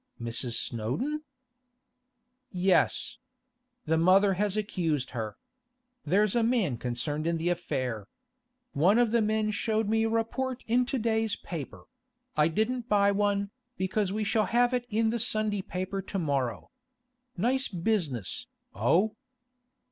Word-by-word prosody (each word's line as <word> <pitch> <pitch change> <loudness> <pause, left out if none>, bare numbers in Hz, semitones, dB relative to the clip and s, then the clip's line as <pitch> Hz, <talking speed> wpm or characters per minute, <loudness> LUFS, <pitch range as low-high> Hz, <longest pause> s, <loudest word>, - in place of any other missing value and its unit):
'Mrs. 115 +1 -3
Snowdon?' 125 - -2 1.3
'Yes. 185 0 +1 0.7
The 160 +1 +2
mother 190 +3 +5
has 205 +2 0
accused 165 - -1
her. 110 -4 -4 0.7
There's 195 +6 +2
a 235 - +4
man 225 - +1
concerned 125 +6 -2
in 170 0 +1
the 165 +2 0
affair. 130 - -2 0.7
One 180 +10 +4
of 240 -2 +3
the 235 0 +3
men 215 0 +1
showed 220 +1 0
me 225 +1 +2
a - - +1
report 245 +3 -1
in 245 +2 +2
to 265 - -1
day's 220 -2 +1
paper; 140 - -7 0.5
I 150 0 +4
didn't 225 +7 -1
buy 200 -1 +4
one, 200 0 0 0.3
because 190 +1 0
we 215 +2 -1
shall 215 +1 +2
have 245 +1 +2
it 245 -1 -1
in 220 0 +2
the 235 - -1
Sunday 215 -2 0
paper 185 +1 -4
to 195 +1 -5
morrow. 140 -8 -1 0.7
Nice 255 +8 +1
business, 170 - -2 0.3
oh? 180 - +2
200 Hz, 135 wpm, -29 LUFS, 155-225 Hz, 1.3 s, mother